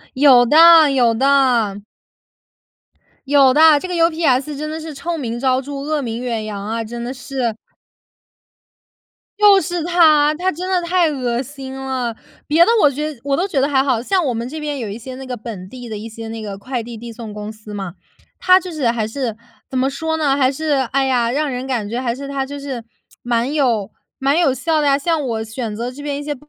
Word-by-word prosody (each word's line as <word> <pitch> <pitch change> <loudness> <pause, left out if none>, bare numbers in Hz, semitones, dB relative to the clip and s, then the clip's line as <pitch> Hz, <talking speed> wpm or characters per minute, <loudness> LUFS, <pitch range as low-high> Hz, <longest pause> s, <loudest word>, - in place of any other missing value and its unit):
有 260 -3 +6
的 320 +2 +7
有 245 -4 +3
的。 245 -5 +2 1.5
有 275 -2 +5
的， 310 +1 +6
这 370 - -6
个 360 - -3
UPS 315 -4 +1
真 305 +1 -4
的 315 - -5
是 315 -1 -7
臭 340 +4 -4
名 235 -5 -4
昭 260 +1 +1
著， 285 +2 -8
恶 300 +1 -1
名 235 -2 -4
远 230 -3 -3
扬 205 -2 -6
啊， 225 +2 -2
真 235 +2 -6
的 245 +2 -4
是！ 250 -4 -3 1.8
就 405 -2 +6
是 350 -3 -3
它， 310 -4 +4
它 370 +3 0
真 360 +3 -6
的 370 -2 +1
太 345 0 +2
恶 245 -3 -2
心 270 -1 -9
了。 260 -3 -3 0.3
别 320 +3 +5
的 455 - +3
我 295 - +6
觉 300 +3 -4
得 250 - -19
我 280 -1 0
都 375 +3 0
觉 275 -8 0
得 280 - +1
还 265 -1 +3
好。 255 -5 0
像 365 +7 +1
我 255 - 0
们 230 +2 -4
这 315 +2 -6
边 295 -2 -4
有 225 -4 -4
一 205 - -6
些 255 +2 -9
那 265 +1 -8
个 250 -1 -4
本 210 -5 -8
地 245 -2 -9
的 220 - -6
一 225 +2 -7
些 225 +1 -8
那 225 0 -6
个 200 -2 -6
快 245 +3 -4
递 230 0 -8
递 235 +1 -8
送 225 -2 -8
公 210 0 -6
司 215 -1 -13
嘛， 195 -3 -5 0.5
它 370 0 +5
就 365 -1 -8
是 295 -7 -1
还 225 -2 -1
是 230 -2 -3 0.3
怎 260 - -3
么 260 +1 +2
说 320 +4 -3
呢， 285 -3 +1
还 260 -2 +2
是 310 +2 -3 0.2
哎 270 0 +2
呀， 245 -3 +1
让 295 +2 0
人 255 +1 -4
感 235 -6 -2
觉 235 +4 -3
还 240 -2 -1
是 280 +2 -7
它 275 -1 -2
就 285 +1 -7
是， 265 -5 -6 0.4
蛮 240 +3 -1
有 235 -9 0 0.3
蛮 275 +4 +1
有 325 -6 +3
效 310 +4 0
的 290 - +1
呀， 275 0 +4
像 325 +1 0
我 225 -4 -3
选 225 -1 -5
择 240 +3 -4
这 275 +3 -11
边 290 -1 -3
一 290 - -6
些 295 0 -3
265 Hz, 245 characters per minute, -19 LUFS, 235-300 Hz, 1.8 s, 的